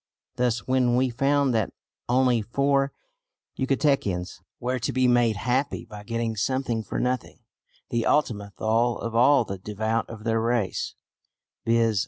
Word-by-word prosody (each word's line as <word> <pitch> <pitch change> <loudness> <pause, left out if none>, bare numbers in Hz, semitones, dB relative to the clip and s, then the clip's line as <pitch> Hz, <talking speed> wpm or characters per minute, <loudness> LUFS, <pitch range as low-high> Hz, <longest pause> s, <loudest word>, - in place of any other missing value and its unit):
Thus 120 -2 0
when 130 -2 +3
we 130 0 +2
found 140 +1 +2
that 110 -4 0 0.4
only 125 -2 +3
four 140 +4 +1 0.6
Yucatecans 130 - 0 0.2
were 125 +1 -1
to 115 - -1
be 130 -1 +2
made 120 -2 +3
happy 125 +7 -1
by 105 -1 -10
getting 115 +1 -2
something 120 +1 -1
for - - -4
nothing 125 0 -2 0.5
(the 120 -1 0
Ultima 110 -9 +1
Thule 115 +2 +1
of 115 - -5
all 125 +2 +5
the 95 -2 -6
devout 110 +3 -2
of 110 -2 -9
their 115 -1 +1
race), 115 -3 -1 0.7
viz. 115 -2 +3
120 Hz, 145 wpm, -25 LUFS, 110-130 Hz, 0.7 s, all